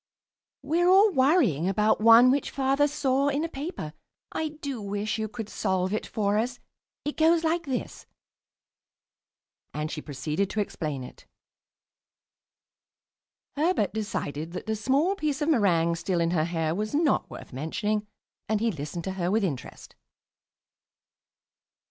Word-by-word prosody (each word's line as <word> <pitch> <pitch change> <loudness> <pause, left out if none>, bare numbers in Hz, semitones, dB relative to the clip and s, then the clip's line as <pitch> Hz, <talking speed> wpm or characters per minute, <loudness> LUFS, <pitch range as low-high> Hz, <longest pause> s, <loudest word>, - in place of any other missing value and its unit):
"We're 335 +5 +2
all 395 +3 +6
worrying 260 - +3
about 210 +2 +2
one 230 +3 +8
which 280 +1 0
Father 275 +2 +2
saw 280 -2 +1
in 285 +2 0
a - - 0
paper. 275 - -6 0.4
I 320 - -2
do 285 -5 -6
wish 205 +2 -2
you 220 - -1
could 220 0 -6
solve 190 -2 -1
it 215 - -2
for 205 -1 0
us. 245 +2 -2 0.5
It 295 - -3
goes 325 +1 +4
like 330 0 0
this." 260 -2 -4 1.7
And 150 +1 -3
she 155 - -5
proceeded 150 +6 -2
to 215 - -3
explain 155 -9 -3
it. - - -13 2.3
Herbert 300 - +1
decided 165 -7 -4
that - - -6
the 220 0 -1
small 275 - +2
piece 305 -8 -2
of 295 - 0
meringue 170 - +3
still 175 +1 -1
in 170 0 +1
her 160 -3 +1
hair 165 -2 -1
was 215 +7 -2
not 305 -2 +2
worth - - -10
mentioning, 210 - -2 0.4
and 215 -1 +2
he 230 +1 +1
listened 155 +1 -5
to 190 - -3
her 180 -2 -2
with 215 +2 +2
interest. 150 -10 -5
215 Hz, 145 wpm, -27 LUFS, 175-285 Hz, 2.3 s, one